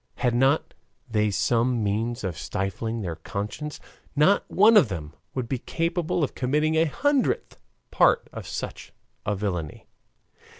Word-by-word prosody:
Had 125 -2 +1
not 135 +5 +2 0.3
they 105 -3 +1
some 120 +3 +1
means 110 +4 -1
of 95 -4 -2
stifling 105 +6 -3
their 85 -5 -4
conscience, 105 - -5 0.4
not 155 +8 +4
one 215 +4 +6
of 155 - +6
them 80 -5 -5 0.2
would 130 -3 -2
be 130 0 -2
capable 165 +3 -1
of 140 - -1
committing 150 +5 +1
a 160 +1 +4
hundredth 280 - 0 0.3
part - - +4
of - - -7
such - - -6 0.3
a 105 - +1
villainy. 90 -6 -4
120 Hz, 140 wpm, -25 LUFS, 100-150 Hz, 0.4 s, one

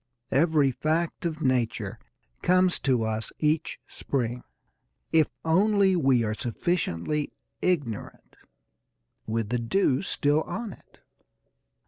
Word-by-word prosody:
Every 145 -1 +3
fact 160 +6 -1
of 160 -1 -5
nature 125 -3 0 0.4
comes 185 0 +3
to 125 -4 +1
us 110 0 -2
each 155 +1 0
spring, 125 -2 -3 0.7
if 160 -2 +5 0.2
only 195 +3 +4
we 135 -7 +3
are 105 -1 -1
sufficiently 145 - -1 0.3
ignorant, 145 - -2 0.9
with 110 -1 -1
the 125 +1 0
dew 130 +3 +1
still 150 -5 +1
on 225 +3 -5
it. - - -21
150 Hz, 105 wpm, -27 LUFS, 120-170 Hz, 0.9 s, if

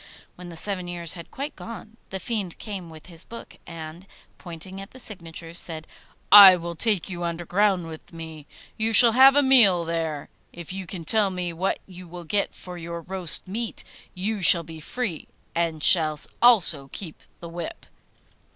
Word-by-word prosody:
When 180 0 -12
the 165 - -9
seven 185 -1 -2
years 170 -2 -3
had 170 -2 -11
quite 285 +2 -7
gone, 225 -1 -11
the 190 - -5
Fiend 195 -3 -4
came 195 -6 -8
with 160 -1 -14
his 170 -2 -7
book, 230 - -12
and, 165 +2 -10 0.3
pointing 185 +2 -9
at 195 - -11
the - - -16
signatures, 170 -6 -3
said, 160 -2 -4 0.5
'I 200 -2 +10
will 170 -1 -6
take 200 +1 0
you 175 -1 -6
underground 175 +2 -1
with 160 -1 -12
me; 160 -3 -11 0.3
you 225 +1 -1
shall 235 +1 +8
have 265 +3 +6
a 290 - +4
meal 210 -11 +5
there. 160 -3 -4 0.2
If 170 +1 -10
you 190 -1 -7
can 170 -3 -7
tell 215 0 +2
me 180 -2 -5
what 185 +4 -2
you 180 -1 -13
will 175 +1 -10
get 200 +5 -2
for 180 -1 -10
your 170 0 -7
roast 185 0 -2
meat, 225 +4 -5 0.3
you 200 +3 -4
shall 170 -1 +8
be 160 0 -11
free, 195 +1 -5 0.3
and 165 -3 -3
shall 155 -4 +4 0.2
also 190 - +6
keep 170 -6 -8 0.2
the 170 - -10
whip. 170 0 -8
175 Hz, 180 wpm, -23 LUFS, 165-200 Hz, 0.5 s, I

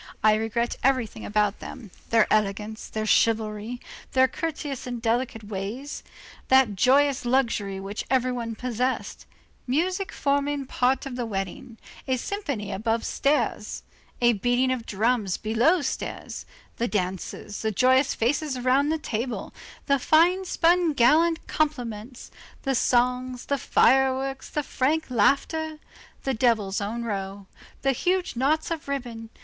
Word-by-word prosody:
I 215 0 +6
regret 225 +2 -1
everything 250 -5 +1
about 210 -1 +1
them, 215 -6 -9 0.2
their 225 -1 +5
elegance, 210 +1 -1
their 215 0 -3
chivalry, 220 +1 +1 0.3
those 260 0 +5
courteous 290 -5 -4
and 245 -1 -4
delicate 230 0 -1
ways, 210 +8 -5 0.5
that 260 -6 +4
joyous 270 +5 +3
luxury 235 -6 0
which 195 +2 -5
every 255 -1 +2
one 230 -2 -4
possessed, 250 +2 -3 0.4
music 365 +9 0
forming 285 0 0
part 255 +1 +1
of 260 -2 -6
the 240 -2 -2
wedding, 220 +4 -5 0.3
a 260 -1 +1
symphony 275 - -4
above 225 +2 -1
stairs, 290 +2 0 0.4
a 240 0 +5
beating 245 +4 +1
of 250 -3 -3
drums 215 -2 0
below 245 +10 +2
stairs, - - -5 0.3
the 235 - 0
dances, 190 +1 -3
the 220 - 0
joyous 260 +5 +3
faces 265 +3 0
round 265 +4 +2
the 320 - +1
table, 240 -4 -4 0.3
the 280 -1 +2
fine 345 +7 +4
spun 345 -2 +3
gallant 315 +6 +3
compliments, 245 -6 -3 0.3
the 270 - 0
songs, 250 0 +1
the 280 -1 -1
fireworks, 265 +2 +2
the 300 - -2
frank 295 +3 0
laughter, 305 +7 +1 0.5
the 270 - 0
devil's 220 -5 +1
own 225 +4 -3
row, 200 -2 -4 0.4
the 270 - +3
huge 360 +6 0
knots 300 +7 +1
of 320 -3 -4
ribbon. 240 -5 -5
250 Hz, 135 wpm, -25 LUFS, 220-280 Hz, 0.5 s, I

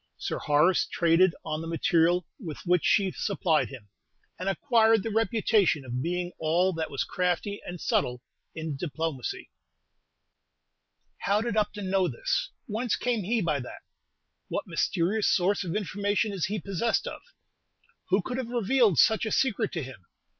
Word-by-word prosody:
Sir - - -3
Horace 150 +5 +3
traded 170 +1 +3
on 155 -1 -3
the 165 - -6
material 165 +1 +2
with 165 - -6
which 180 -1 +3
she 195 -2 +3
supplied 180 -6 0
him, 125 -7 -11 0.5
and 185 +2 -1
acquired 225 0 +3
the 225 - -3
reputation 220 - +2
of 125 0 -3
being 175 +3 -2
all 175 +4 +2
that 160 -1 -3
was 140 - -2
crafty 180 +3 -1
and 175 0 -6
subtle 125 -4 0 0.3
in 160 -2 -4
diplomacy. 150 -2 -4 1.7
How 200 +1 +1
did 230 -2 -2
Upton 205 -2 -1
know 190 -2 +3
this? 125 -7 -1 0.2
Whence 225 +3 -1
came 245 -3 -1
he 225 +4 0
by 155 -4 0
that? 125 - -9 0.6
What - - -3
mysterious 200 +6 0
source 195 +2 +2
of 175 -1 -4
information 205 +1 0
is 190 -5 -1
he 210 +2 -2
possessed 195 +5 -1
of? - - -6 0.9
Who 190 +1 +2
could 250 - -4
have 245 -3 -4
revealed 235 - +2
such 220 - +4
a - - -3
secret 230 -5 +1
to 165 -5 -2
him? 125 -8 -11
185 Hz, 155 wpm, -27 LUFS, 160-210 Hz, 1.7 s, such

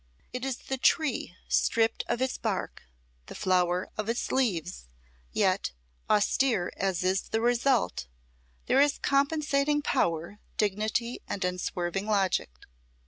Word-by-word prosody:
It 250 0 -4
is 265 -2 -2
the 265 -1 -5
tree 265 - +1
stripped 225 0 +2
of 240 +2 0
its 260 - -1
bark, - - -3 0.5
the - - -9
flower 180 -1 +1
of 215 +1 -2
its 235 - -1
leaves, 180 - -1 0.4
yet, - - +1 0.4
austere 210 -2 +2
as 190 -2 -1
is 185 +1 0
the 225 - 0
result, 240 - +1 0.6
there 270 - +4
is 290 0 +3
compensating 290 0 +1
power, 170 - 0 0.2
dignity 215 +4 0
and 195 - -2
unswerving 180 +1 -2
logic. 195 - +1
220 Hz, 125 wpm, -28 LUFS, 185-265 Hz, 0.6 s, there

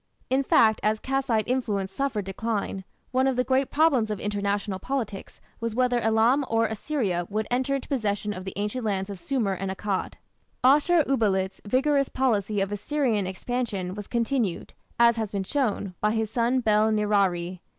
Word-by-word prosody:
In 265 +1 +3
fact, 220 -5 +4
as 215 +1 +1
Kassite 260 -4 0
influence 210 -7 -1
suffered 240 -7 -2
decline, 200 -1 -3 0.3
one 260 +1 +2
of 265 - +1
the 250 - +2
great 265 +1 +1
problems 285 -8 +3
of 210 -2 -3
international 205 -1 -2
politics 230 -5 -4 0.2
was 230 -1 -3
whether 250 -1 +2
Elam 225 +5 +3
or 225 0 +2
Assyria 215 - -2
would 215 +1 -1
enter 260 +3 +1
into 270 - -4
possession 210 -6 -1
of 185 - -7
the 190 - -6
ancient 210 +5 -2
lands 200 -2 -1
of 195 - -7
Sumer 230 -4 -1
and 190 +1 -4
Akkad. 190 0 -2 0.5
Ashur 300 +5 +5
uballit's 200 -8 0
vigorous 275 +4 +2
policy 215 -6 0
of 195 +1 -1
Assyrian 215 -2 0
expansion 195 -2 -3
was 205 0 -7
continued, 235 -5 -1 0.3
as 235 -1 +5
has 220 -3 -2
been 200 -2 -2
shown, 210 -5 -1
by 210 0 +2
his 220 -1 -1
son 245 +2 +1
Bel 215 -1 +3
nirari. 195 -4 +1
220 Hz, 170 wpm, -26 LUFS, 200-255 Hz, 0.5 s, Ashur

